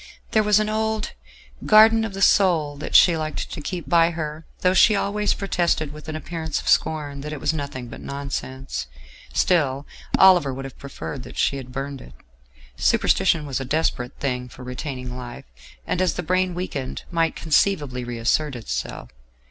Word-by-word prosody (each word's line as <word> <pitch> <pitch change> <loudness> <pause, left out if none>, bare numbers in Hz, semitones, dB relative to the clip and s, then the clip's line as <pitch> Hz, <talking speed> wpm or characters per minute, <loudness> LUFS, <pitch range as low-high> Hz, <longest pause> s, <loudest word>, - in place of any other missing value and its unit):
There 220 - +4
was 210 -1 +4
an 215 - 0
old 220 0 -1 0.5
"Garden 220 +1 +6
of 210 -3 -4
the 195 - 0
Soul" 165 -7 +3
that 145 - -5
she 175 -2 +7
liked 155 -1 -4
to - - -6
keep 175 +3 -5
by 170 -1 +4
her, 155 -1 -5
though 180 0 +3
she 210 +3 +6
always 205 +1 0
protested 170 -6 0
with 150 +1 -10
an 155 - -4
appearance 160 -1 -3
of - - -9
scorn 145 -3 +1
that 150 +2 -6
it 150 - -5
was 145 - 0
nothing 140 -5 -5
but 115 - -10
nonsense. 130 - -5 0.4
Still, 135 - +1 0.3
Oliver 175 -8 +6
would 135 +1 -6
have 135 - -10
preferred 140 0 -7
that - - -11
she 140 - +1
had 130 -2 -8
burned 135 0 -5
it: - - -13 0.6
superstition 150 - +2
was 140 -2 -2
a - - -3
desperate 130 -3 -1
thing 125 -2 -2
for 125 - -12
retaining 125 -1 -5
life, 120 -1 -8 0.4
and, 180 - -1
as 180 -4 +1
the 180 - -3
brain 185 +1 +1
weakened, 145 -8 -4
might 165 -2 +1
conceivably 150 -6 +1
reassert 120 +5 0
itself. 115 -2 -5
150 Hz, 175 wpm, -23 LUFS, 135-180 Hz, 0.6 s, she